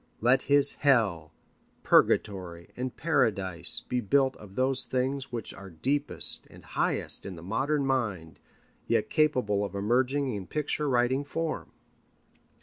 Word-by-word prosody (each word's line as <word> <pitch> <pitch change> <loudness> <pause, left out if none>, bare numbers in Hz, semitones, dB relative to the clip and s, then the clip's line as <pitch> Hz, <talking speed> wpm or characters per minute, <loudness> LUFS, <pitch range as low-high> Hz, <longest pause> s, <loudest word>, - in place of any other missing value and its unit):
Let 125 +3 +3
his 145 0 +7
Hell, 105 - +2 0.5
Purgatory, 90 -5 +1
and 125 0 -5
Paradise 100 - +1
be 125 0 -1
built 135 +4 +2
of 100 -2 -14
those 130 0 +1
things 130 +1 -2
which 120 -2 -5
are 100 0 -11
deepest 140 - -1
and - - -16
highest - - 0
in 95 - -7
the 85 - -11
modern 135 - -1
mind, 110 -12 -2 0.5
yet - - 0
capable 125 -10 +1
of 100 - -5
emerging 130 +6 0
in 100 -3 -6
picture 150 0 -2
writing 125 +2 +1
form. 160 +2 -4
125 Hz, 135 wpm, -28 LUFS, 100-140 Hz, 0.5 s, his